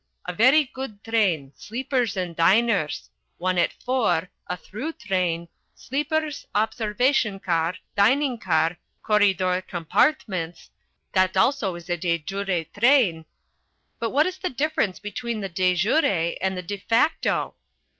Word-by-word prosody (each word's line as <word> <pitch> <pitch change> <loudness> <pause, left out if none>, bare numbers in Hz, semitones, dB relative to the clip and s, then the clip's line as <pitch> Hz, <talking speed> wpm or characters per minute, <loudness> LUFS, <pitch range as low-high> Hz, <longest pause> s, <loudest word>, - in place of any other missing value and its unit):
A 180 - -4
very 260 - +5
good 255 -6 -8
train 185 -12 0
sleepers 240 - -2
and 180 -2 -3
diners 195 -1 +2 0.3
one 185 0 0
at 170 - +2
four, 195 -10 0 0.2
a 180 - -3
through 265 - -6
train 180 - -1 0.3
sleepers, 300 +2 -2
observation 220 0 +1
car, 170 -1 0 0.2
dining 250 +5 +3
car, 165 -3 +1 0.2
corridor 190 -3 +2
compartments 180 - -1 0.4
that 185 -1 +2
also 220 -10 +2
is 170 -1 -10
a 175 -1 -1
de 170 0 0
jure 190 +1 -2 0.2
train 225 - +4 0.4
" - - -48
"But 230 - -1
what 295 +5 +3
is 370 +1 -4
the 370 -1 -2
difference 270 -8 -1
between 220 +2 -4
the 195 - -4
de 180 +1 +1
jure 180 - +2
and 190 0 -1
the 180 - -4
_de 200 +3 -5
facto? 235 +10 +1
200 Hz, 135 wpm, -24 LUFS, 180-245 Hz, 0.4 s, very